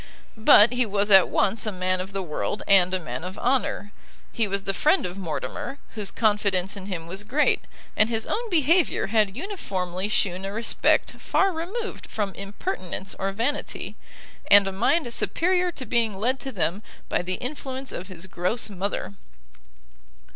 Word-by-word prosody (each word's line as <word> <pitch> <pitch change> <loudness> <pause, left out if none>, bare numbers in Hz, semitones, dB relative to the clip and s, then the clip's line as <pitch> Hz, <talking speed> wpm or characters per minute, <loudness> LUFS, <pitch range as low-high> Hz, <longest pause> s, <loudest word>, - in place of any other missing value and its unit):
But 220 +1 +7
he 250 0 +2
was 205 -1 0
at 190 -1 +8
once 215 +2 +1
a - - 0
man 185 -1 -1
of 190 +2 -7
the 195 -1 -3
world 175 +5 -3
and 185 -2 +5
a 185 - +1
man 125 -4 -6
of 185 +2 -6
honour; 245 -5 0 0.4
he 225 -2 0
was 200 0 -2
the 195 - 0
friend 310 - +2
of 180 0 -4
Mortimer, 185 - -5 0.2
whose 210 -3 -2
confidence 205 -3 +1
in 195 -1 -8
him 175 -5 -4
was 190 +4 -5
great, 280 +8 +1 0.3
and 215 - +3
his 225 -1 -1
own 470 +1 -2
behaviour 335 0 +3
had 210 -3 +2
uniformly 190 - -3
shewn 185 -3 0
a 195 - -4
respect 225 +2 +2
far 390 0 +2
removed 385 +9 -5
from 205 -3 -2
impertinence 195 - -4
or 195 0 -1
vanity, 230 +9 -3 0.5
and 200 -1 +8
a - - -1
mind 240 - +1
superior 360 +5 +1
to 260 - -5
being 225 -3 +1
led 250 +6 0
to 270 - -6
them 190 -2 -1 0.3
by - - 0
the 185 +1 -1
influence 265 +1 -5
of 180 - -6
his 185 -2 -8
gross 190 +5 -2
mother. 200 +1 -3
205 Hz, 170 wpm, -25 LUFS, 190-250 Hz, 0.5 s, at